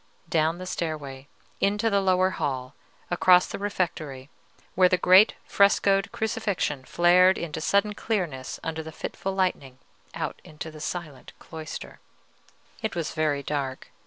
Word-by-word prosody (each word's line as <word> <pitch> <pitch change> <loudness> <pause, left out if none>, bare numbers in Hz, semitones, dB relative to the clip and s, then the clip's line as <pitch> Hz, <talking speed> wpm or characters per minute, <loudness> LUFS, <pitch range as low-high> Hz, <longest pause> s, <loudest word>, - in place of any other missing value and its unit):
Down 160 +1 +1
the 185 - -7
stairway 150 -6 -5 0.3
into 205 +3 +1
the 200 0 +3
lower 185 0 +3
hall, 130 -5 -3 0.4
across 180 +1 +5
the - - -6
refectory, 155 -9 -3 0.4
where 185 0 +5
the 180 - +3
great 185 +4 +6
frescoed 200 0 +3
Crucifixion 205 - -2
flared 180 +4 +5
into 160 -2 -4
sudden 200 +5 +2
clearness 175 - -3
under 160 0 -3
the 160 0 -8
fitful 195 +4 -5
lightning, 160 -9 -1 0.4
out - - -4
into 155 +1 -8
the 155 -1 -11
silent 155 -5 -6
cloister. 160 -1 -8 0.8
It 220 -4 -3
was 165 -3 -3
very 155 -3 0
dark. 140 -3 -4
175 Hz, 135 wpm, -26 LUFS, 150-190 Hz, 0.8 s, great